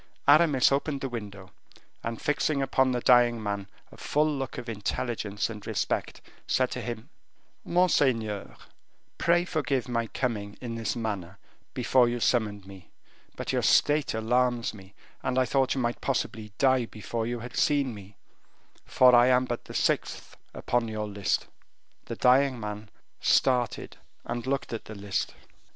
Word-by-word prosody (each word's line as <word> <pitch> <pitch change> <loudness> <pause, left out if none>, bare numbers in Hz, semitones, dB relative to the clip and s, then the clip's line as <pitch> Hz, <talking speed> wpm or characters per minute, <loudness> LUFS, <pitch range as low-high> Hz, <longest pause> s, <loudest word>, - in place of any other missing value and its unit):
Aramis 145 -3 +5
opened 140 0 -1
the 135 - -3
window, 100 -5 -8 0.5
and 115 -1 -4
fixing 145 0 0
upon 135 -1 +2
the 125 -1 -1
dying 120 -1 +5
man 100 -1 -3 0.2
a - - -15
look - - -15
full 150 -1 +1
of 130 -2 -6
intelligence 105 -1 -2
and 105 -2 -9
respect, - - -2 0.3
said 130 -1 +1
to 125 - -4
him: 120 +2 -6 0.5
"Monseigneur, 130 - +1 0.6
pray 175 +1 +3
forgive 140 -7 -1
my 115 -2 -1
coming 105 -5 -3
in 120 -2 -5
this 115 0 -2
manner, 100 -5 -4 0.4
before 125 -2 +3
you 120 0 -2
summoned 105 -5 0
me, 95 -3 -13 0.5
but - - -4
your - - +1
state 150 -4 +3
alarms 120 +1 +1
me, 95 -2 -14 0.3
and 130 - -2
I 130 - +4
thought 135 +1 +1
you 130 - -1
might 120 0 -2
possibly 110 -5 -2
die 130 -3 +3
before 115 +1 -4
you 120 -1 -3
had 125 +1 -8
seen 140 -4 +2
me, 100 -1 -12 0.7
for 125 -1 +5
I 120 0 +7
am 125 0 +4
but 120 -1 -4
the - - -10
sixth - - -1 0.2
upon 120 -1 0
your 110 -1 -3
list." 100 -1 -1 0.6
The - - -5
dying 130 0 +3
man 105 0 -6 0.3
started 125 -2 +1 0.3
and 120 +1 -4
looked 135 -2 -2
at 115 - -5
the 110 - -9
list. 100 -1 -3
120 Hz, 155 wpm, -27 LUFS, 110-130 Hz, 0.7 s, I